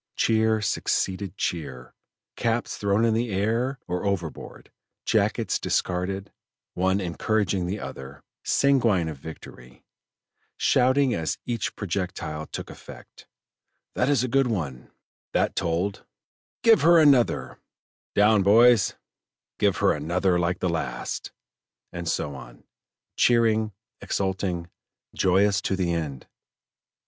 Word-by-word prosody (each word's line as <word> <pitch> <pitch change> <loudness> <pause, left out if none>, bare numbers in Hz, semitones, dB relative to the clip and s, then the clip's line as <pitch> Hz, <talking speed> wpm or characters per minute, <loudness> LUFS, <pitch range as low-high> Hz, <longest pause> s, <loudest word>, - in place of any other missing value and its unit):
Cheer 110 -1 +2
succeeded 95 -1 -1
cheer, 65 -7 -4 0.4
caps 115 0 -1
thrown 100 +2 +1
in 115 - +2
the 115 +2 0
air 115 +7 0
or 90 0 -2
overboard, 90 -7 -4 0.3
jackets - - +1
discarded, 95 +2 -2 0.4
one 95 +2 +1
encouraging 95 +1 -1
the 100 +4 -3
other, 65 -5 -9 0.2
sanguine 120 -11 +2
of 80 -3 -5
victory, 65 -4 -12 0.7
shouting 130 +1 +3
as 80 -2 -2
each 115 -4 -3
projectile 85 -5 -4
took - - -7
effect: - - -14 0.7
"That - - +1
is 140 -4 +3
a - - 0
good 135 +1 +2
one;" 75 - -4 0.4
"that - - +1
told;" 90 +4 -1 0.6
"give 230 -1 +6
her 170 +1 +6
another;" 140 -6 +3 0.6
"down 105 0 +5
boys;" 110 +1 +5 0.6
"give - - +2
her - - +3
another 90 +4 0
like 85 +1 -1
the 90 - +1
last;" 75 -8 -4 0.6
and 85 -1 -4
so 75 - -2
on, - - -12 0.5
cheering, 110 -2 +3 0.3
exulting, 95 -3 -2 0.5
joyous 95 +1 +2
to 95 - -1
the 90 -3 0
end. 75 -6 -4
95 Hz, 115 wpm, -25 LUFS, 85-110 Hz, 0.7 s, give